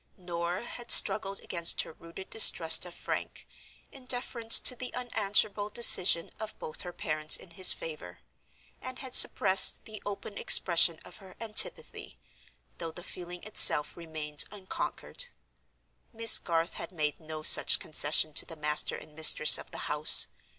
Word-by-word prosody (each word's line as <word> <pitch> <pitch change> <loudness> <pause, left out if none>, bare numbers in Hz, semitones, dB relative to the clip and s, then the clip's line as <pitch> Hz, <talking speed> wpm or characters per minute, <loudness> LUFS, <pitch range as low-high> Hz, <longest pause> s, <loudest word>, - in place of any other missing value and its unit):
Norah 175 +2 -9
had 240 0 -12
struggled 195 -2 +2
against 170 -2 +2
her - - -17
rooted 170 +4 -17
distrust 165 -6 +3
of 175 - -15
Frank, - - -10 0.4
in 265 -2 -17
deference 245 -2 +2
to 250 - +2
the 250 +1 -11
unanswerable 210 -3 -4
decision 185 -6 +3
of 220 0 -12
both 155 - -8
her 180 - -12
parents 155 -2 0
in 175 - -19
his 185 +2 +4
favor; 90 - -10 0.6
and 255 0 -9
had 260 -2 -11
suppressed 190 -5 +4
the 215 -1 -13
open 205 0 -12
expression 170 -2 +2
of 180 - -15
her 190 -2 -19
antipathy, 225 - -3 0.6
though 165 -1 -10
the 175 +2 -15
feeling 175 0 -13
itself 180 -7 +2
remained 155 -3 -6
unconquered. 205 - -9 0.9
Miss 230 -1 +4
Garth 165 0 -6
had - - -11
made 150 -4 -7
no 155 -1 -13
such - - +4
concession 155 0 -2
to - - +2
the 165 - -13
master 150 0 -1
and 155 - -17
mistress 155 0 +5
of - - -15
the - - -12
house. 150 +1 0
175 Hz, 150 wpm, -24 LUFS, 160-215 Hz, 0.9 s, mistress